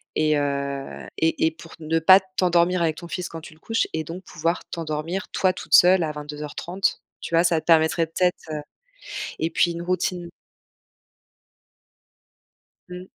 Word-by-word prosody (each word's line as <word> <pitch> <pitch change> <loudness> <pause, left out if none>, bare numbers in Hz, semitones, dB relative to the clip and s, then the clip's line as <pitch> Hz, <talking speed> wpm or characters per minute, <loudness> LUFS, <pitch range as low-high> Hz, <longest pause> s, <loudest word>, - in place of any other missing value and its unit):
et 155 -1 +2
heu, 140 -1 -3
et 160 0 +1
et 160 - +2
pour 165 +1 -14
ne 165 +1 0
pas 185 +4 +8
t'endormir 180 -2 +1
avec 160 -2 0
ton 170 - -8
fils 180 0 -4
quand 165 - -8
tu 155 - -12
le 155 - -23
couches 225 +6 -1
et 160 - -2
donc 170 +4 -8
pouvoir 165 +1 -2
t'endormir, 165 +3 -4
toi, 185 -1 +2
toute - - -8
seule, 180 +1 +7
à 155 - -2
22:30. 150 +5 -3 0.2
Tu 170 - -3
vois? 165 - +5
Ça 170 -2 +2
te - - -32
permettrait 165 0 +3
peut-être, 180 +2 +1 0.2
heu 150 -1 -3 0.8
et 160 - 0
puis, 175 - +2
une 170 0 -6
routine 180 0 -2 2.6
Mmh. 180 +1 -8
165 Hz, 165 wpm, -24 LUFS, 155-180 Hz, 2.6 s, pas